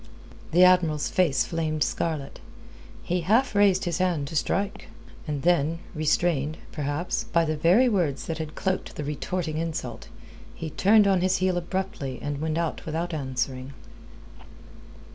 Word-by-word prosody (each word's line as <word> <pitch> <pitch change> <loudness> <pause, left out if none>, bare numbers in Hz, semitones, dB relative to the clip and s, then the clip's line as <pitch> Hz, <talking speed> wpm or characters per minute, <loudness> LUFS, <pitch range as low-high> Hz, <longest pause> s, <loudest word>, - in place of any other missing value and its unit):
The 175 +3 +5
Admiral's 175 -5 +4
face 165 -8 +2
flamed 155 -2 -1
scarlet. 155 -5 -3 0.6
He 180 +1 -1
half 225 +10 +2
raised 200 -2 +4
his 175 0 -1
hand 175 -6 0
to - - -7
strike. 195 +6 -1 0.4
And 145 -2 -3
then, 165 -2 +2 0.2
restrained, 155 -1 +1
perhaps, 145 +3 -2
by 170 -1 +2
the 155 0 -1
very 180 +12 +4
words 175 - 0
that 165 -1 -4
had 155 -1 -5
cloaked 190 0 -2
the 150 - -4
retorting 155 +2 -3
insult, 165 -1 -4 0.5
he 160 -1 -6
turned 210 +5 +5
on 190 -2 +3
his 185 0 +2
heel 185 0 +1
abruptly 175 -6 -3
and 145 0 -4
went 160 0 -1
out 170 -2 -2
without 165 +2 -2
answering. 130 -2 -3
165 Hz, 145 wpm, -26 LUFS, 150-185 Hz, 0.6 s, The